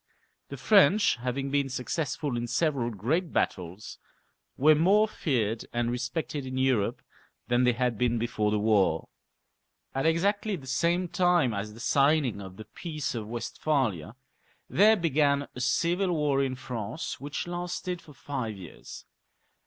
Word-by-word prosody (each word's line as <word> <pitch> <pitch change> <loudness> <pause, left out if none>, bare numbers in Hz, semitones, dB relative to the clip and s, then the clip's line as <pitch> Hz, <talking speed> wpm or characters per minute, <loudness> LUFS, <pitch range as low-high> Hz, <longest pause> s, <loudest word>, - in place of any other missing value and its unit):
The 140 - -7
French 200 - +4
having 130 +3 -3
been 140 -1 +1
successful 140 +1 -2
in 120 0 -2
several 140 -4 0
great 140 - -1
battles, 90 +3 -3 0.6
were 155 +4 +6
more 195 +8 +4
feared 115 - -1
and 120 0 -1
respected 130 +4 -3
in 130 0 -5
Europe 130 -6 +1 0.5
than 120 +1 +3
they 125 - +4
had 120 -2 -1
been 120 -1 +2
before 110 -2 0
the 105 - +1
war. 105 -6 +2 0.8
At 135 +4 0
exactly 200 +5 +1
the 140 -7 -10
same 170 +7 +1
time 175 - +2
as 105 +1 -5
the - - -12
signing 140 -4 +2
of 95 -1 -10
the 110 - -9
Peace 155 +6 -5
of 110 -3 -5
Westphalia 115 - -2 0.5
there 215 +3 +5
began 145 -4 +1
a - - -8
civil 175 +7 +1
war 145 -3 +1
in 130 -1 -2
France, 125 +2 -5
which 145 +2 -4
lasted 175 0 -4
for 150 - -15
five 125 -8 -4
years. 90 -4 -11
135 Hz, 145 wpm, -28 LUFS, 115-160 Hz, 0.8 s, were